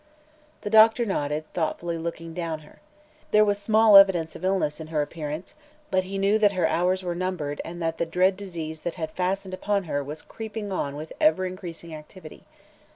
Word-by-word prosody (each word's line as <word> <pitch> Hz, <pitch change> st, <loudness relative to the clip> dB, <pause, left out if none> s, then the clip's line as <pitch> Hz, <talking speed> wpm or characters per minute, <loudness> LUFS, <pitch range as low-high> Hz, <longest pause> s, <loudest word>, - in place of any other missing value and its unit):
The 205 Hz, -, -5 dB
doctor 225 Hz, +2 st, +6 dB
nodded, 150 Hz, -6 st, -2 dB
thoughtfully 170 Hz, 0 st, -2 dB
looking 165 Hz, 0 st, -5 dB
down 165 Hz, -2 st, -4 dB
her. 150 Hz, -, -18 dB, 0.5 s
There 215 Hz, 0 st, +5 dB
was 205 Hz, -1 st, 0 dB
small 215 Hz, 0 st, +5 dB
evidence 175 Hz, -5 st, +5 dB
of -, -, -10 dB
illness 185 Hz, -6 st, 0 dB
in 160 Hz, -, -7 dB
her 155 Hz, -2 st, 0 dB
appearance, 155 Hz, +2 st, -6 dB, 0.4 s
but 185 Hz, 0 st, +2 dB
he 195 Hz, +1 st, -5 dB
knew 200 Hz, +2 st, +2 dB
that 205 Hz, -2 st, +4 dB
her 180 Hz, -3 st, +1 dB
hours 180 Hz, +3 st, +1 dB
were 175 Hz, -1 st, -2 dB
numbered 170 Hz, -5 st, -3 dB
and 175 Hz, +1 st, -8 dB
that 165 Hz, 0 st, -2 dB
the 170 Hz, -, 0 dB
dread 185 Hz, +3 st, +2 dB
disease 165 Hz, -5 st, -6 dB
that 175 Hz, -, -4 dB
had 160 Hz, -3 st, -4 dB
fastened 185 Hz, +2 st, -2 dB
upon 200 Hz, +1 st, -1 dB
her 145 Hz, -4 st, -2 dB
was 150 Hz, +3 st, -7 dB
creeping 220 Hz, -2 st, -6 dB
on 145 Hz, -6 st, -2 dB
with 155 Hz, +2 st, -7 dB
ever 305 Hz, -12 st, +4 dB
increasing 175 Hz, -3 st, -7 dB
activity. 155 Hz, +2 st, -12 dB
180 Hz, 190 wpm, -25 LUFS, 160-195 Hz, 0.5 s, doctor